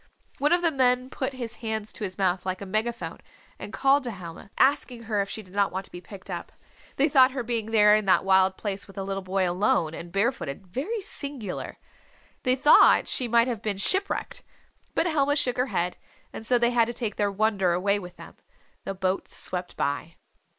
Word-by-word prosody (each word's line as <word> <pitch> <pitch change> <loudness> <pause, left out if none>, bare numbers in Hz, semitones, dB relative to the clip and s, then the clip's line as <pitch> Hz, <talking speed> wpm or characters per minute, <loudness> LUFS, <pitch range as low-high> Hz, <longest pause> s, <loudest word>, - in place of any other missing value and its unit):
One 290 +2 +2
of 350 0 +3
the 335 - +3
men 255 -2 +2
put 265 0 -3
his 235 -3 -6
hands 220 -2 -4
to - - -7
his 185 -2 -4
mouth 185 -2 +1
like 185 0 -3
a 200 - -7
megaphone 215 +4 -3 0.4
and - - -7
called 275 +1 +3
to - - -2
Helma, 185 -3 -9
asking 260 -3 +2
her 215 -2 0
if 200 - -3
she 220 - -6
did 185 -1 -17
not 200 -1 +2
want 190 +1 -4
to - - -13
be 175 - -9
picked 195 0 -10
up. - - -6 0.4
They 280 - +3
thought 260 -3 +5
her 260 -3 -3
being 230 -2 -2
there 210 -2 +5
in 215 -1 0
that 190 - +3
wild 190 0 +4
place 195 -3 -4
with 195 - -15
a 195 - -2
little 195 0 -3
boy, 190 0 0
alone, 175 -3 +1
and 170 +1 -8
barefooted, 195 - -1
very 300 - -3
singular. 280 - -4 0.6
They 255 -1 +2
thought 280 +3 +6
she 250 - -1
might 235 +1 +4
have 235 -5 -3
been 210 -3 -2
shipwrecked. 390 - 0 0.5
But - - +2
Helma 290 -4 +2
shook 255 -4 0
her 250 +2 +1
head, 180 -6 -2 0.4
and - - -7
so 245 +2 +3
they 240 0 +2
had 235 -2 +4
to 235 - -5
take 225 -4 -3
their 205 -1 +1
wonder 200 -3 +1
away 200 +3 +1
with 180 -2 -10
them. - - -12 0.5
The 195 - -4
boat 190 0 -1
swept 180 -1 -4
by. 145 +4 -2
215 Hz, 215 wpm, -26 LUFS, 190-255 Hz, 0.6 s, thought